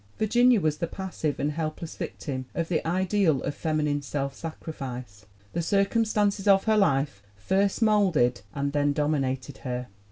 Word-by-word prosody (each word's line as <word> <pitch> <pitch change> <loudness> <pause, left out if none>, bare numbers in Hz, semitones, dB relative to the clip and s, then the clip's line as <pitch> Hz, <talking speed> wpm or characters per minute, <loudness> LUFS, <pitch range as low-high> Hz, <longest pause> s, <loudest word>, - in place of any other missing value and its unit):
Virginia 240 +2 +4
was 155 -3 0
the 170 - -1
passive 180 -5 -3
and 145 +2 0
helpless 155 +1 -4
victim 130 -3 -5
of 165 -1 -1
the 170 - 0
ideal 185 -3 +2
of - - -2
feminine 150 -2 0
self 140 -1 -3
sacrifice. 125 -10 -7 0.3
The 170 - 0
circumstances 205 +2 +1
of 195 -1 +6
her 220 -1 +3
life 140 - +2
first 195 - +1
molded 180 - +3
and 140 0 -1
then 145 -1 +2
dominated 140 -2 -1
her. 125 -2 -4
155 Hz, 150 wpm, -27 LUFS, 140-195 Hz, 0.3 s, of